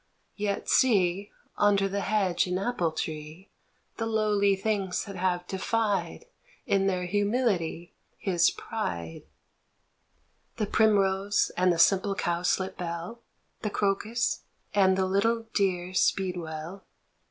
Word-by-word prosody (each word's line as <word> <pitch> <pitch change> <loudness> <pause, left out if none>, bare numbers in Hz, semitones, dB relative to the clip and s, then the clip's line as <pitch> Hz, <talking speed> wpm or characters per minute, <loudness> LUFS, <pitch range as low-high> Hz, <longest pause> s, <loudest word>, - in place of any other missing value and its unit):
Yet 205 -1 -2
see 200 -5 +3 0.3
Under 200 -1 +4
the 200 +1 -2
hedge 195 -3 +1
and 180 0 -1
apple 195 -5 -1
tree 155 +3 -6 0.5
The 225 - -2
lowly 210 -3 +2
things 195 -2 -1
that 200 -2 -8
have 180 -1 -1
defied 205 - -1 0.4
In 195 -5 +2
their 180 -2 0
humility 200 -4 0 0.2
his 175 -3 +2
pride: 85 - -5 1.3
The 215 - 0
primrose 200 -2 +2
and 180 0 +3
the 170 - 0
simple 195 +4 +3
cowslip 180 +2 -1
bell, 175 +6 -5 0.4
The 210 - -1
crocus 210 +4 0 0.3
and 190 -2 +4
the 190 - +2
little 225 +5 +1
dear 185 -2 0
speedwell 175 -1 -1
195 Hz, 115 wpm, -28 LUFS, 180-205 Hz, 1.3 s, Under